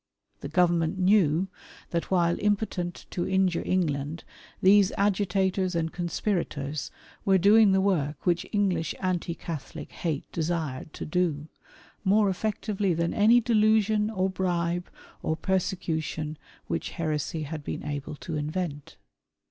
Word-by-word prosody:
The - - -6
Government 175 0 +2
knew, 185 -3 +3 0.4
that 170 -1 -2
while 175 -2 +3
impotent 200 -4 -1
to 175 - -2
injure 190 -2 +2
England, 155 -3 -1 0.4
these 195 0 +5
agitators 190 -2 +1
and 165 -1 -1
conspirators 160 -6 -2 0.3
were 195 -1 +4
doing 205 +2 +6
the 190 0 +3
work 155 -8 0
which 175 -1 +1
English 185 -6 0
anti 180 -2 -1
Catholic 155 -7 -7
hate 160 -5 -2
desired 160 -4 -2
to - - -6
do, 160 -3 -1 0.5
more 205 0 +4
effectively 200 -1 -1
than 170 +1 0
any 220 +3 +6
delusion, 215 -1 +3
or 190 -4 0
bribe, 175 -2 -1 0.3
or 160 - 0
persecution 160 -5 -2 0.3
which - - -3
heresy 155 -1 -2
had 150 0 -6
been - - -5
able 145 0 -4
to 160 +2 -6
invent. 150 -1 -4
175 Hz, 125 wpm, -27 LUFS, 160-195 Hz, 0.5 s, doing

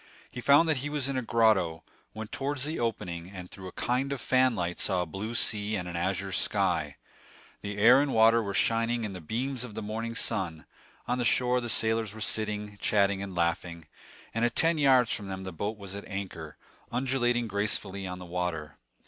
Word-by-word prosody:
He 125 - -6
found 145 +6 +6
that 155 -3 +2
he 140 +3 -3
was 145 -3 -1
in 140 - -2
a 130 - 0
grotto, 110 -9 +2 0.3
went 110 0 -6
towards 140 0 -2
the 155 +2 -3
opening, 90 -7 -3
and 90 -2 -9
through 95 -1 -9
a - - -7
kind 130 +7 -1
of 140 - -2
fanlight 115 -10 +1
saw 90 -1 +1
a - - -5
blue 100 +8 -5
sea 105 -1 +1
and 90 -3 -3
an 85 - -6
azure 95 +2 -1
sky. - - +1 0.7
The 100 0 -5
air 120 +6 +7
and 145 -1 0
water 115 0 +5
were 100 -2 -4
shining 115 +1 +2
in 105 -3 -3
the 90 - -7
beams 125 - -2
of 115 -4 -8
the - - -4
morning 115 +2 -4
sun; 90 - -2 0.4
on 125 +1 0
the - - +1
shore 125 +1 +2
the 120 - -4
sailors 110 -1 +2
were - - -9
sitting, 105 -1 -2
chatting 100 -2 +2
and 100 -2 -6
laughing; 85 -1 -1 0.5
and 115 - 0
at 120 -1 +1
ten 165 -1 +3
yards 130 -4 +5
from 100 - -4
them 95 0 -5
the 95 -1 -6
boat 105 +6 -3
was 100 -2 -9
at 100 - -7
anchor, 95 -6 -6 0.3
undulating 120 -1 +1
gracefully 100 -1 -1
on 90 0 -5
the 90 - -9
water. 85 -4 -3
110 Hz, 205 wpm, -29 LUFS, 95-120 Hz, 0.7 s, air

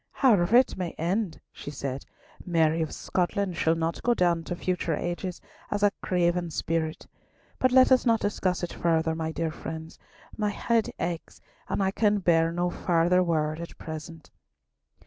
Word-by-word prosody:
"However 220 -5 +4
it 255 - +3
may 180 -2 -3
end," 180 +1 -1
she - - -8
said, 140 -2 -5 0.4
"Mary 165 -2 +2
of 160 - -2
Scotland 185 0 -1
shall 160 0 +2
not 165 0 -2
go 240 0 +2
down 175 -3 +2
to 175 - -3
future 175 -2 -1
ages 175 +2 -4 0.3
as 205 0 -1
a 205 - +5
craven 175 -1 +1
spirit. 160 0 -2 0.5
But 255 - +3
let 260 +1 +6
us 255 - +5
not 230 -2 +3
discuss 185 -4 -1
it 175 - -3
further, 160 -1 +1
my 160 0 -3
dear 160 0 -2
friends, 160 +1 -8 0.4
my 210 -1 0
head 225 +2 0
aches, 170 -2 -4 0.3
and 200 - 0
I 190 - +1
can 210 0 +2
bear 165 -3 +3
no 175 +1 -1
farther 175 +1 +2
word 155 -3 0
at 170 - -8
present." 160 0 -8
175 Hz, 165 wpm, -27 LUFS, 165-195 Hz, 0.5 s, let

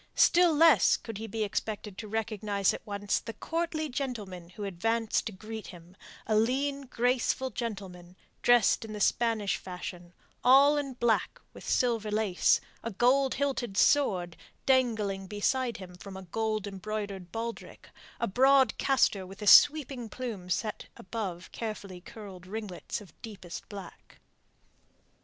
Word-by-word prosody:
Still 350 0 +5
less 310 - +5
could 225 -3 -8
he 225 - -5
be 220 +1 -2
expected 210 -1 -3
to 215 - -6
recognize 210 -2 0
at - - -7
once 205 0 -1
the 225 - -7
courtly 325 -1 -2
gentleman 215 - -5
who 205 +3 -8
advanced 225 +4 0
to - - -4
greet 215 +2 -8
him 175 +1 -13 0.3
a 215 - +1
lean, 275 +5 0
graceful 250 +1 0
gentleman, 190 -6 -6 0.3
dressed 240 -3 +4
in 220 -1 -7
the 210 - -5
Spanish 220 -1 +1
fashion, 180 -1 -8 0.3
all 275 +3 +7
in 285 -2 -2
black 240 -2 0
with - - -9
silver 230 -4 +1
lace, 210 -3 +2 0.2
a 230 - -2
gold 255 +5 +2
hilted 265 -7 -2
sword 185 - +3 0.3
dangling 220 -7 +1
beside 235 +5 0
him 185 -2 -10
from 190 +2 -10
a 190 - -8
gold 215 +3 -2
embroidered 200 -2 -5
baldrick, 230 +2 -6 0.3
a - - +1
broad 265 +5 +4
castor 250 -7 +2
with 195 +3 -10
a - - -4
sweeping 270 -2 +6
plume 220 -9 -6
set 215 +4 -2
above 185 -4 -5
carefully 200 -5 -6
curled 190 -2 -11
ringlets 210 0 -5
of 190 -6 -15
deepest 195 -6 -9
black. 195 -4 -11
215 Hz, 145 wpm, -29 LUFS, 195-245 Hz, 0.3 s, all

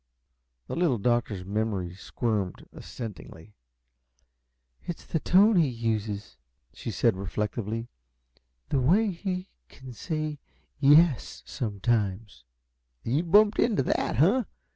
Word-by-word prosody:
The - - -5
Little 165 -8 +2
Doctor's 110 -4 0
memory 100 -3 -2
squirmed 100 0 -3
assentingly. 105 -4 -9 1.3
"It's 175 - -7
the 160 - -1
tone 200 +6 +5
he 165 -4 +4
uses," 110 - -3 0.4
she - - -7
said, - - +2
reflectively. 105 +4 -3 0.8
"The 140 - +1
way 195 - +3
he 185 +1 -4 0.2
can 130 -2 -11
say 155 +2 -4 0.4
'yes,' 145 -1 +4
sometimes 105 - -2 0.3
" - - -49
"You've 150 +9 -1
bumped 210 +1 +5
into 215 - +2
that, - - 0
huh? 195 - +3
120 Hz, 110 wpm, -27 LUFS, 105-165 Hz, 1.3 s, tone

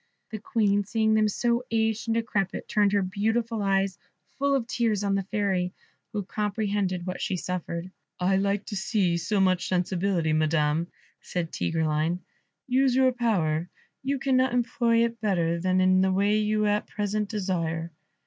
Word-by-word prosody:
The 215 - -4
Queen 205 -1 +1
seeing 220 +2 +1
them 215 0 +4
so 235 +3 0
aged 225 0 0
and 225 - +1
decrepit, 215 -4 -1
turned 205 -1 +2
her 200 -1 +3
beautiful 220 +4 -1
eyes, 195 -2 +1 0.4
full 280 0 +2
of 255 -4 0
tears, 225 -4 0
on 200 -1 +1
the 195 - +1
Fairy, 195 -3 -1 0.4
who 205 -1 -2
comprehended 200 -3 -1
what 185 -1 -4
she 185 - -1
suffered. 180 0 -4 0.3
"I 190 +2 +2
like 200 +1 0
to 205 - -5
see 190 -3 +1
so 200 +5 0
much 185 -2 +2
sensibility, 180 -2 0
madam," 155 +1 +1 0.3
said 170 -2 -3
Tigreline; 160 +2 0 0.4
"use 260 0 +2
your 260 0 +4
power, 180 -9 0 0.3
you 275 +1 -1
cannot 260 -2 +2
employ 235 -1 +2
it 230 0 -5
better 170 -5 +1
than 185 +1 +1
in 185 0 +4
the 190 0 +2
way 200 +2 +2
you 215 0 +1
at 210 0 +1
present 210 0 -2
desire." 170 -5 -2
200 Hz, 160 wpm, -26 LUFS, 180-220 Hz, 0.4 s, them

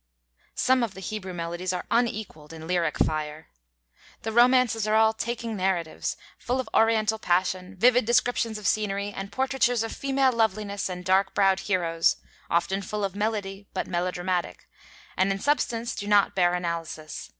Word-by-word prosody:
Some 260 0 +3
of 225 -5 -2
the - - -8
'Hebrew 190 0 -5
Melodies' 175 +1 -3
are 180 - -4
unequaled 215 -10 -1
in 160 0 -9
lyric 170 -2 0
fire. 155 0 -2 0.7
The 225 - -2
romances 240 -2 +4
are 215 - +2
all 220 0 +5
taking 230 0 -4
narratives, 185 -4 -1 0.2
full 250 +2 -1
of 260 - -3
Oriental 220 -1 +3
passion, 185 0 0
vivid 245 +5 +4
descriptions 235 -1 +1
of 210 - -9
scenery, 200 0 0
and 195 +1 -6
portraitures 255 -2 +1
of 225 - -4
female 270 -1 +2
loveliness 215 -4 -1
and 180 -1 -6
dark 190 +2 +2
browed 195 -1 +3
heroes, 170 -4 +1 0.3
often 175 +3 +1
full 210 +2 -4
of 195 -1 -2
melody, 205 -2 -3
but - - -1
melodramatic; 175 - -2 0.5
and 190 +1 +2
in 195 - -1
substance 235 -2 0
do 205 - -6
not 205 -1 +4
bear 175 -1 +2
analysis. 165 -3 -5
200 Hz, 160 wpm, -26 LUFS, 180-225 Hz, 0.7 s, all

